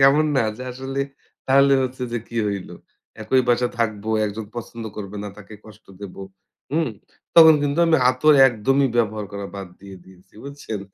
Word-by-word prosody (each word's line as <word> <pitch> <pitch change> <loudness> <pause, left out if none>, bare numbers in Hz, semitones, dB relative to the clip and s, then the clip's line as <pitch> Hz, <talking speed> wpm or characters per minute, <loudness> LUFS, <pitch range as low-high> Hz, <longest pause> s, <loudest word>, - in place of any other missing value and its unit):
কেমন 140 +3 +5
না? 125 - +3
যে - - -6
আসলে 135 +2 -5 0.5
তাহলে 140 +1 +5
হচ্ছে 130 0 -6
যে 120 - -1
কী 115 - -4
হইল? 100 -2 -4 0.5
একই 130 +4 +2
বাসায় 120 0 +1
থাকব, 110 -3 -1 0.2
একজন 105 +2 -6
পছন্দ 115 -1 -7
করবে 105 -1 -7
না, - - -5
তাকে 105 +1 -12
কষ্ট 110 0 -16
দেব। 100 -3 -8 0.6
হুম? 160 -1 +1 0.5
তখন 160 -1 +9
কিন্তু 145 +2 -1
আমি 160 -1 +4
আতর 150 +4 +4
একদমই 135 +4 +1
ব্যবহার 110 -2 0
করা 100 0 -5
বাদ 95 -2 -7
দিয়ে 100 -1 -11
দিয়েছি। 95 0 -20
বুঝছেন? 140 -7 -7
120 Hz, 170 wpm, -22 LUFS, 105-135 Hz, 0.6 s, তখন